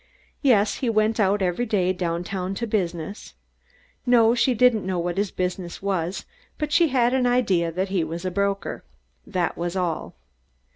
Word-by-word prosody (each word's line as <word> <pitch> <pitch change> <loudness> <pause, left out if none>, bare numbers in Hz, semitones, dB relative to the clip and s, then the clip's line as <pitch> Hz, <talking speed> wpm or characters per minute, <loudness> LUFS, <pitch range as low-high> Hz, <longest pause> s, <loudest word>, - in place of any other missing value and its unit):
Yes, 215 -7 +3
he 250 - -1
went 220 0 +1
out 200 -1 +2
every 185 +7 0
day, 185 -4 +1
downtown 180 +2 -3
to 235 - -2
business. 185 -3 -3 0.7
No, 235 -2 +5
she 250 +1 +2
didn't 235 -2 +4
know 185 -1 -2
what 175 0 -2
his 205 -1 0
business 180 -1 -4
was, 190 -2 -2 0.3
but 300 -1 -3
she 335 +2 +5
had 250 -3 +2
an 255 -1 +2
idea 195 -9 +2
that 185 +3 -2
he 190 -3 +1
was 165 +3 -5
a 185 - -1
broker. 200 +1 -2 0.4
That 180 -4 -1
was 175 +1 -2
all. 175 -4 -2
195 Hz, 165 wpm, -24 LUFS, 180-230 Hz, 0.7 s, No